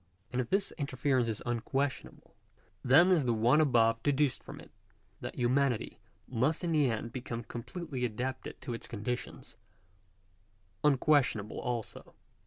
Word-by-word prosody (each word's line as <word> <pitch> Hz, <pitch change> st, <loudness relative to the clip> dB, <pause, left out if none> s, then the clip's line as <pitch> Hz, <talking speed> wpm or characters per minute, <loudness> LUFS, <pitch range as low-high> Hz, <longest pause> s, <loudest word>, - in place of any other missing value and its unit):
And 125 Hz, -, 0 dB
if 120 Hz, -, -6 dB
this 195 Hz, 0 st, +1 dB
inference 130 Hz, -3 st, +1 dB
is 110 Hz, -2 st, -3 dB
unquestionable, 135 Hz, +4 st, -3 dB, 0.5 s
then 155 Hz, +9 st, +6 dB
is 160 Hz, -7 st, +3 dB
the 120 Hz, -2 st, +2 dB
one 120 Hz, +8 st, +4 dB
above 115 Hz, -5 st, +3 dB
deduced 145 Hz, 0 st, +1 dB
from -, -, -10 dB
it -, -, -14 dB, 0.3 s
— -, -, -38 dB
that -, -, -6 dB
humanity 125 Hz, -1 st, 0 dB, 0.3 s
must 130 Hz, +8 st, 0 dB
in 170 Hz, -, 0 dB
the 150 Hz, -5 st, +3 dB
end 115 Hz, 0 st, -3 dB
become 120 Hz, -2 st, -5 dB
completely 130 Hz, +4 st, -6 dB
adapted 125 Hz, +3 st, -3 dB
to 125 Hz, -2 st, -4 dB
its 115 Hz, -, -7 dB
conditions 120 Hz, +2 st, -5 dB, 0.6 s
— 95 Hz, +1 st, -38 dB
unquestionable 135 Hz, -7 st, +2 dB
also. 120 Hz, -3 st, -5 dB
125 Hz, 145 wpm, -31 LUFS, 115-140 Hz, 0.6 s, then